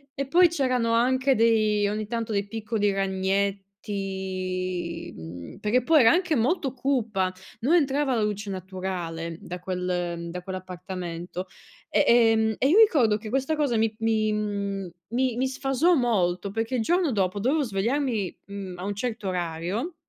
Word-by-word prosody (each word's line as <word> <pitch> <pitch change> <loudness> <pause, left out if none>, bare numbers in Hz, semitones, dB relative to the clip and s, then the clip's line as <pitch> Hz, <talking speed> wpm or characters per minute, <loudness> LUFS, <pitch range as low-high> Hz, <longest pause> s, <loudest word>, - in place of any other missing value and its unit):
E 275 0 -3
poi 350 +6 +6
c'erano 255 -7 0
anche 260 +3 +3
dei 215 -2 +3
ogni 210 0 -3
tanto 230 0 -3
dei 200 -1 -1
piccoli 215 -1 -1
ragnetti, 190 -2 -2
mhmm, 85 +1 -9
perché 215 +4 +1
poi 315 +4 +5
era 230 -4 +7
anche 360 -1 +2
molto 270 +4 +1
cupa, 225 -8 0 0.3
non 260 +8 +1
entrava 280 -4 +2
la 225 - +1
luce 210 -1 -2
naturale 180 -3 -4
da 180 +1 -7
quel 180 -2 -3
da 180 +1 -5
quell'appartamento, 180 -1 -6 0.4
e - - +3
ehm, 225 -2 +4
e 265 - +3
io 350 - +5
ricordo 280 - +5
che 215 +1 -9
questa 270 +6 0
cosa 285 -6 +1
mi 220 0 +2
mi 220 -1 +1 0.8
mi 250 0 +1
mi 260 +2 +1
sfasò 270 +6 +2
molto, 200 - +1
perché 225 +4 -2
il 245 - +1
giorno 345 +4 +2
dopo 200 -2 0
dovevo 285 +7 +2
svegliarmi, 230 -1 -1
mhmm, 195 -3 -7
a 180 - -5
un 205 0 -2
certo 220 -1 -3
orario 180 - -3
215 Hz, 150 wpm, -26 LUFS, 185-255 Hz, 0.8 s, era